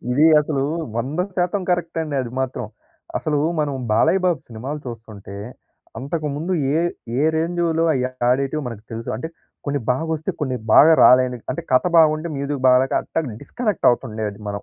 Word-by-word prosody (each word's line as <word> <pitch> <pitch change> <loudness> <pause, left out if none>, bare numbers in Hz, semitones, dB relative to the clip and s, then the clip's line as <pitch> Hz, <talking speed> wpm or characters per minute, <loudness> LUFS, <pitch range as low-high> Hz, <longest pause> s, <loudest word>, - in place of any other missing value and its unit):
ఇది 150 +5 +5
అసలు 145 -2 -1 0.3
100% 180 - -1
కరెక్ట్ 170 -2 -1
అండి 150 -2 -5
అది 120 -2 -5
మాత్రం. 125 -3 -3 0.5
అసలు 150 -2 -1 0.2
మనం 145 -2 -1 0.2
బాలయ్య 185 - +3
బాబు 175 -5 +2
సినిమాలు 130 +7 -6
చూస్తుంటే, 110 -4 -9 0.6
అంతకుముందు 150 +4 -3 0.2
ఏ - - +2 0.4
ఏ - - +2
రేంజ్‌లో 165 0 0
అయి 125 -1 0 0.2
ఆడేటివి 135 +3 0
మనకు 110 -2 -9
తెలుసు. 115 +1 -6
అంటే 160 +8 -5 0.4
కొన్ని 145 -1 -1
బాగా 145 +6 -1
వస్తే, 155 0 -3
కొన్ని 130 -3 -1 0.2
బాగా 160 +3 +8
రాలేనివి. 125 -2 +4
అంటే 170 - -6
కథ 130 - +5 0.2
బాగుంటే, 155 +1 +3
మ్యూజిక్ 140 -1 -3
బాగాలేక 130 +1 +4
అట్లా 165 - -2 0.2
డిస్కనెక్ట్ 225 -4 0
అవుతుండేది 110 -4 -3
మనం. 100 0 -4
145 Hz, 150 wpm, -21 LUFS, 125-160 Hz, 0.6 s, బాగా